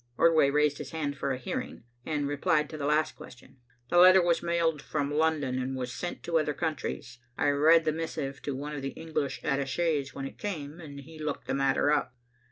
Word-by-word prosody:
Ordway 160 -4 +5
raised 145 0 +2
his 145 -2 -6
hand 145 -3 -3
for 140 -1 -2
a 130 - -1
hearing 125 - -5 0.2
and 150 -2 -1
replied 150 +1 +1
to 155 - -6
the 140 - -1
last 155 +1 +1
question. 125 +2 -14 0.3
"The 175 - +5
letter 185 +1 +9
was 170 -1 +2
mailed 170 -3 0
from 145 -1 -2
London, 150 -4 +1
and 130 +1 -3
was 125 -1 -4
sent 175 - -5
to 165 -1 +1
other 150 -2 -1
countries. 150 -6 -4 0.2
I - - +2
read 155 +3 +5
the 155 - +3
missive 150 -4 -4
to 140 - -3
one 145 +3 -5
of 145 - -4
the 135 0 -5
English 155 -4 -3
attachés 140 +1 0
when 135 - -4
it - - -9
came, 160 -6 -5
and 145 -4 -9
he 155 +3 -13
looked 150 -2 -4
the - - -2
matter 135 +1 +2
up. 145 -4 0
150 Hz, 210 wpm, -29 LUFS, 140-160 Hz, 0.3 s, letter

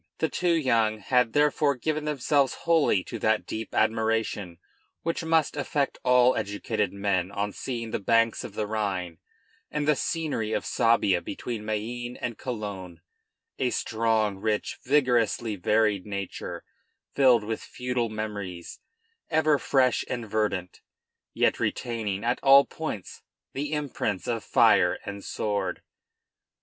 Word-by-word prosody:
The 160 - 0
two 175 -1 +1
young 115 -8 +2
had 125 +2 +1
therefore 145 -1 +3
given 155 +4 -2
themselves 140 -2 +1
wholly 155 - +3
to - - -7
that 110 0 +1
deep 110 0 -6
admiration 110 -5 0 0.5
which 165 0 -2
must 160 -2 +2
affect 145 -1 -1
all 125 0 +5
educated 105 0 -2
men 100 -2 0
on 100 +1 -2
seeing 115 -2 -5
the - - -1
banks 115 +2 +2
of 100 - -8
the 105 - -1
Rhine 95 -6 -3 0.5
and 150 -1 -2
the 150 - +5
scenery 145 -10 -2
of - - -1
Suabia 100 -6 +2
between 115 +1 -5
Mayenne 120 +3 -4
and 120 -2 -4
Cologne, 100 -9 -6 0.6
a 130 - +2
strong, 110 -3 0
rich, 105 0 -2
vigorously 120 -5 +2
varied 105 +1 +1
nature, 100 -2 -5 0.5
filled 125 -5 +5
with 110 +1 -3
feudal 125 -2 -2
memories, 100 -5 -6 0.5
ever 155 -2 +3
fresh 130 -2 +2
and 120 -3 -3
verdant, 100 -4 -2 0.5
yet - - +1
retaining 110 -5 -2
at 120 +1 0
all 140 0 +7
points 155 - -6 0.3
the 145 +2 -3
imprints 135 - -2
of 115 -3 -2
fire - - +4
and 100 0 -6
sword. 105 -1 -2
115 Hz, 135 wpm, -27 LUFS, 105-130 Hz, 0.6 s, all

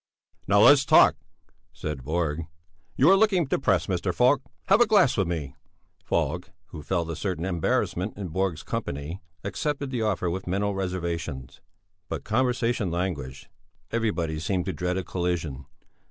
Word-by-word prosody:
"Now, 100 +1 +5
let's 145 +2 +7
talk," 140 - +6 0.6
said 75 -4 -5
Borg. 80 +1 -2 0.5
"You 145 +8 +5
are - - +8
looking 195 -4 +3
depressed, 135 - +1
Mr. 90 -1 -1
Falk; 125 +9 +3 0.2
have 200 +4 +4
a 240 - +6
glass 205 - +4
with 95 -5 +1
me." 75 -6 -4 0.5
Falk, 85 +2 -1 0.2
who 75 - -8
felt 85 +2 -1
a - - -4
certain 90 -1 -3
embarrassment 90 +2 -1
in 100 -3 -5
Borg's 90 -1 -1
company, 75 +6 -4 0.2
accepted 140 +7 -2
the 125 -3 -2
offer 105 -4 0
with 95 +2 -3
mental 100 +3 0
reservations. 85 -8 -4 0.5
But - - -4
conversation 120 -2 0
languished, 85 -7 -4 0.4
everybody 90 -9 -1
seemed 90 +2 -1
to 95 - -2
dread 90 0 -2
a 95 - -2
collision. 80 -6 -3
90 Hz, 150 wpm, -26 LUFS, 80-110 Hz, 0.6 s, are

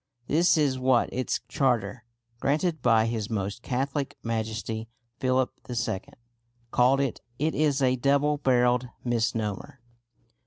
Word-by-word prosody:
This 165 +6 +3
is 140 -4 +2
what 130 -2 +2
its 130 0 -1
charter, 120 -4 0 0.3
granted 155 +3 0
by 115 -2 +4
His 115 -2 -2
Most 105 0 -3
Catholic 135 +3 -2
Majesty 110 0 -3 0.3
Philip 130 0 +1 0.2
II., 110 -5 -1 0.7
called 130 +2 +4
it. 135 -4 -1 0.2
It 155 +3 0
is 145 -3 +1
a 130 0 +3
double 140 +3 +2
barrelled 125 -2 +2 0.2
misnomer. 115 0 -2
125 Hz, 120 wpm, -27 LUFS, 115-140 Hz, 0.7 s, by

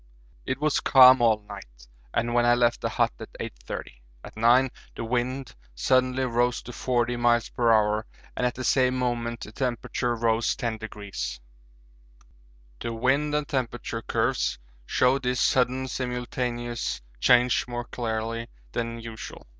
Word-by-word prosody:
It 130 +1 -1
was 150 -1 +2
calm 130 -1 +7
all 110 -2 +3
night - - -12 0.2
and 120 - -1
when 120 0 +3
I 120 0 +5
left 120 -1 +2
the - - -1
hut - - +1
at - - -9
8.30. - - -6 0.4
At - - -11
9 120 +4 +4 0.2
the - - -4
wind 125 +2 -2 0.2
suddenly 130 - +2
rose 120 0 0
to 125 - -9
40 120 0 0
m.p.h. 120 -1 +2 0.8
and 125 - +1
at 125 - -4
the 130 - -5
same 130 +1 +3
moment 120 -2 -2
the 105 - -7
temperature 120 0 -2
rose 115 0 +1
10°. 105 - -5 1.4
The 115 - -4
wind 140 +5 +1
and 150 -1 -1
temperature 120 -3 -3
curves - - 0 0.3
show 130 +2 +3
this 125 -2 -1
sudden 130 +1 +2
simultaneous 125 -1 -3 0.2
change 125 - +4
more 120 0 -4
clearly 115 -1 -3 0.2
than 115 -1 -3
usual. 115 -1 -9
120 Hz, 140 wpm, -26 LUFS, 115-125 Hz, 1.4 s, calm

